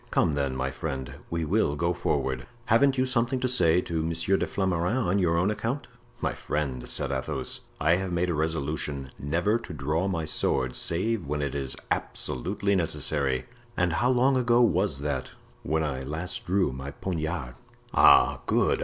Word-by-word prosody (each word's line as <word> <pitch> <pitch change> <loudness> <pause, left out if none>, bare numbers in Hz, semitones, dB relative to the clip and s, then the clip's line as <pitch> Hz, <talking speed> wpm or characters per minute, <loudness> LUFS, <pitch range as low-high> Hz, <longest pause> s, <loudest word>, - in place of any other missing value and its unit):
Come, 80 - +2
then, 70 -2 -1
my 65 +1 -1
friend, 65 -1 -4 0.2
we 85 -1 -1
will 80 -3 +1
go 85 +3 0
forward." 65 -5 -1 0.2
"Haven't 135 +4 +4
you 130 - +3
something 125 +1 0
to 130 - 0
say 90 -9 +4
to 85 -2 -2
Monsieur 85 +4 0
de - - 0
Flamarens 95 +3 0
on 95 +3 +2
your 85 -3 +2
own 90 +5 +2
account?" 115 +6 -3 0.3
"My - - 0
friend," 70 -5 -3
said - - +1
Athos, 65 -1 -3 0.2
"I 80 +4 +4
have 95 -1 -3
made 90 0 +1
a - - 0
resolution 75 -3 -2
never 85 - +1
to 105 -7 -9
draw 75 +6 -1
my 85 -5 -1
sword 65 -4 +1
save 95 +1 -1
when 75 0 -1
it 70 - -2
is 70 -2 -2 0.2
absolutely 100 - -1
necessary." 70 -6 0 0.3
"And 90 -2 +2
how 120 +8 +2
long 130 +1 +3
ago 120 -1 +3
was 95 - +2
that?" 75 0 -3 0.3
"When 80 +1 0
I 70 -4 -2
last 80 +6 -4
drew 95 -4 +2
my 65 +2 -6
poniard." 80 -4 -3 0.4
"Ah! - - +6
Good! - - +2
85 Hz, 175 wpm, -27 LUFS, 70-100 Hz, 0.4 s, Ah